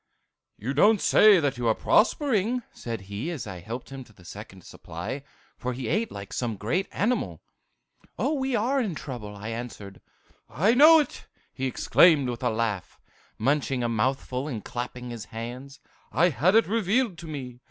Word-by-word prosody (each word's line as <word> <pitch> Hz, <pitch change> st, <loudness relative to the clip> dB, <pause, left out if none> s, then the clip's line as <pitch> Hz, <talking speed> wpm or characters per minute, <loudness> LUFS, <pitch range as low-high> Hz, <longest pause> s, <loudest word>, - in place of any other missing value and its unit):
"'You 125 Hz, +6 st, -3 dB
don't 205 Hz, +9 st, +5 dB
say 210 Hz, 0 st, +6 dB
that 140 Hz, -5 st, -1 dB
you're 115 Hz, -2 st, +2 dB
prospering,' 245 Hz, -1 st, +2 dB
said 115 Hz, -3 st, -6 dB
he, 100 Hz, -, -5 dB
as 170 Hz, -5 st, -5 dB
I 95 Hz, -4 st, -7 dB
helped 115 Hz, +9 st, -7 dB
him 135 Hz, -1 st, -7 dB
to -, -, -20 dB
the 90 Hz, -3 st, -19 dB
second 95 Hz, -1 st, -10 dB
supply; 140 Hz, -, -7 dB, 0.4 s
for 125 Hz, +1 st, -3 dB
he 125 Hz, -1 st, -5 dB
ate 220 Hz, -, 0 dB
like 100 Hz, -1 st, -8 dB
some 120 Hz, -3 st, -2 dB
great 140 Hz, -, -1 dB
animal. 240 Hz, +5 st, -1 dB, 0.7 s
"'We 265 Hz, -4 st, 0 dB
are 255 Hz, +5 st, +1 dB
in 200 Hz, -9 st, -2 dB
trouble!' 120 Hz, -8 st, -7 dB
I 105 Hz, +2 st, -7 dB
answered. 115 Hz, -4 st, -7 dB, 0.5 s
"'I 195 Hz, -, +2 dB
know 310 Hz, +5 st, +8 dB
it!' 290 Hz, -, -7 dB, 0.3 s
he 135 Hz, 0 st, -2 dB
exclaimed, 145 Hz, +1 st, +4 dB
with 120 Hz, -, -7 dB
a -, -, +1 dB
laugh, 110 Hz, -4 st, -3 dB, 0.4 s
munching 135 Hz, 0 st, 0 dB
a -, -, +1 dB
mouthful 130 Hz, +3 st, -1 dB
and 115 Hz, -8 st, -5 dB
clapping 125 Hz, 0 st, -5 dB
his 115 Hz, -3 st, -7 dB
hands. 125 Hz, +5 st, -8 dB, 0.3 s
'I 175 Hz, +3 st, +4 dB
had 180 Hz, +6 st, +2 dB
it 225 Hz, -, +6 dB
revealed 215 Hz, -1 st, 0 dB
to 170 Hz, -, -9 dB
me! 130 Hz, -5 st, -7 dB
130 Hz, 170 wpm, -26 LUFS, -, 0.7 s, know